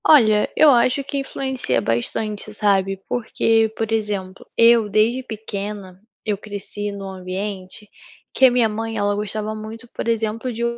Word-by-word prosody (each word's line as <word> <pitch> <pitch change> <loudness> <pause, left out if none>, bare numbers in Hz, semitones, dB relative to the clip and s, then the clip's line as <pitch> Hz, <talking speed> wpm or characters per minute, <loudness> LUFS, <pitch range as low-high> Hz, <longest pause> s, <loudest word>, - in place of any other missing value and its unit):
Olha, 215 -8 +5
eu 305 -2 +8
acho 255 +2 +3
que 280 - -4
influencia 265 - -2
bastante, 200 - -2
sabe? 195 -2 +2
Porque, 225 -2 +1
por 225 -1 -2
exemplo, 205 -4 -2
eu 230 -2 +6
desde 225 +5 +2
pequena, 205 -5 -6 0.2
eu 210 -2 +1
cresci 205 0 -5
num 200 -1 -7
ambiente 190 +1 -6 0.5
que 265 - +5
a 255 - +7
minha 240 -2 +3
mãe, 225 +1 -4
ela 205 0 +1
gostava 210 +1 -3
muito, 220 +2 -8
por - - -5
exemplo, 225 +2 -1
de 235 0 -4
215 Hz, 150 wpm, -21 LUFS, 200-230 Hz, 0.5 s, eu